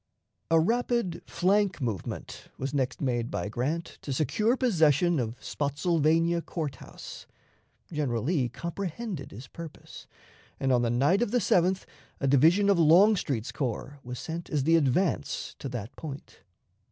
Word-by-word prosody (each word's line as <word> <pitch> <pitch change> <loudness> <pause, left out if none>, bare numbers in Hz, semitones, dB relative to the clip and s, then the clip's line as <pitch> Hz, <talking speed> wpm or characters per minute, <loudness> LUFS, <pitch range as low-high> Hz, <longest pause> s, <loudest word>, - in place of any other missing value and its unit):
A 165 0 +5
rapid 235 0 0
flank 195 0 +2
movement 115 - -5
was 135 +1 -4
next 130 -3 -1
made 120 -4 0
by 90 +4 -3
Grant 150 +10 -3
to 140 - -5
secure 160 - +1
possession 170 - +3
of 115 0 -3
Spottsylvania 165 +3 +1
Court 150 -6 -4
House. - - -10 0.7
General 130 -7 -1
Lee 140 -4 +1
comprehended 170 - -5
his 120 +6 -10
purpose, 165 +2 -10 0.5
and 135 - +1
on 125 -1 +4
the 120 - +1
night 140 - +3
of 240 - +1
the 245 - +1
7th 185 -3 +2 0.3
a 135 - 0
division 160 +9 +5
of 200 -3 +4
Longstreet's 160 - +4
corps 135 +3 -4
was 125 0 -6
sent 165 +4 -6
as 145 -3 0
the 165 +3 +4
advance 165 +4 0
to 135 - -5
that 120 -2 -6
point. 145 -3 -9
155 Hz, 145 wpm, -28 LUFS, 130-180 Hz, 0.7 s, A